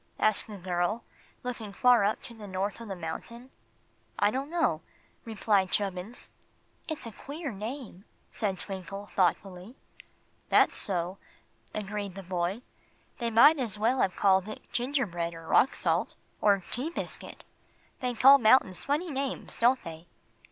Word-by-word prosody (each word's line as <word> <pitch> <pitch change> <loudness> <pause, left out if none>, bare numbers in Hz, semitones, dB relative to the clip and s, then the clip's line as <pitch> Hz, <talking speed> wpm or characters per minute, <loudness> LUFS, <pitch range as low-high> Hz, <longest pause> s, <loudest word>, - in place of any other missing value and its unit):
asked 215 -1 +2
the 210 -2 -8
girl, 180 +4 -1 0.4
looking 235 -4 -5
far 245 0 +5
up 210 +2 +1
to 255 - -8
the 215 -2 -10
top 195 +3 -3
of 230 - -8
the 195 - -4
mountain. 235 +9 -7 0.7
"I 205 - +3
don't 270 +4 -3
know," 320 - +1 0.4
replied 205 -4 +1
Chubbins. 195 +3 -3 0.6
"It's 315 -5 -4
a 230 - -6
queer 285 - -6
name," 215 -1 -7 0.3
said 195 -3 -2
Twinkle, 195 +1 -6
thoughtfully. 190 +2 -1 0.7
"That's - - +5
so," 180 -1 -1 0.6
agreed 205 -2 -4
the 195 - -7
boy. 180 +5 -2 0.6
"They 235 -1 0
might 280 +7 +7
as 225 -5 0
well 235 +5 +2
have 185 - +1
called 190 0 +3
it 215 - -9
'gingerbread' 215 -11 -1
or 165 0 -10
'rock 255 +10 +4
salt,' - - 0 0.3
or 205 -1 +5
'tea 260 +6 -1
biscuit.' 340 - -6 0.6
They 250 -1 -2
call 275 +4 +8
mountains 220 -5 +4
funny 305 +4 0
names, 275 -1 -4
don't 250 +3 +3
they?" 165 0 -9
210 Hz, 145 wpm, -29 LUFS, 190-250 Hz, 0.7 s, call